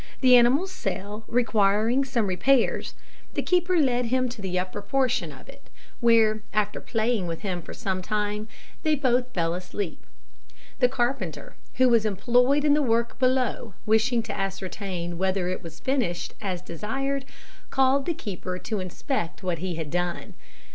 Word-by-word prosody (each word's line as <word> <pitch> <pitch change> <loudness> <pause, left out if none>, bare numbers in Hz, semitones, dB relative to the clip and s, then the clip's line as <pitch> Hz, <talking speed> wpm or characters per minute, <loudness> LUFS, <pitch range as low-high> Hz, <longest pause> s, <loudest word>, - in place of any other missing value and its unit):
The 255 -2 +7
animal's 265 +10 +4
cell 210 - -4
requiring 225 +1 +2
some 245 -5 0
repairs, 225 +7 +2 0.4
the - - 0
keeper 360 0 +2
led 250 -5 +2
him 255 +2 +1
to 240 -3 -8
the 185 -2 -2
upper 185 +3 -3
portion 255 +4 0
of - - -13
it, - - -15 0.3
where, 225 -2 +4
after 210 -1 0
playing 225 -4 0
with 165 -1 -4
him 185 -3 -3
for - - -9
some 190 -5 -2
time, 210 +1 -2 0.3
they 310 -2 +2
both 255 -2 +1
fell 170 -5 0
asleep. 180 0 -5 0.7
The 250 -2 +5
carpenter, 240 - -2 0.2
who 255 0 +5
was 230 -3 +4
employed 245 +7 +2
in 290 - +5
the 300 - +3
work 235 -3 +1
below, 255 -5 +1
wishing 220 +2 +3
to 215 -3 -5
ascertain 190 -3 -4
whether 190 -1 0
it 185 - -3
was 165 -2 -10
finished 245 -10 -1
as 185 -4 -3
desired, 270 - -3 0.5
called 270 +1 +2
the 340 - 0
keeper 185 -5 -5
to 215 +2 -3
inspect 185 - -3
what 180 -3 -1
he 180 0 -3
had 160 -3 -5
done. 175 0 -2
220 Hz, 160 wpm, -26 LUFS, 185-255 Hz, 0.7 s, The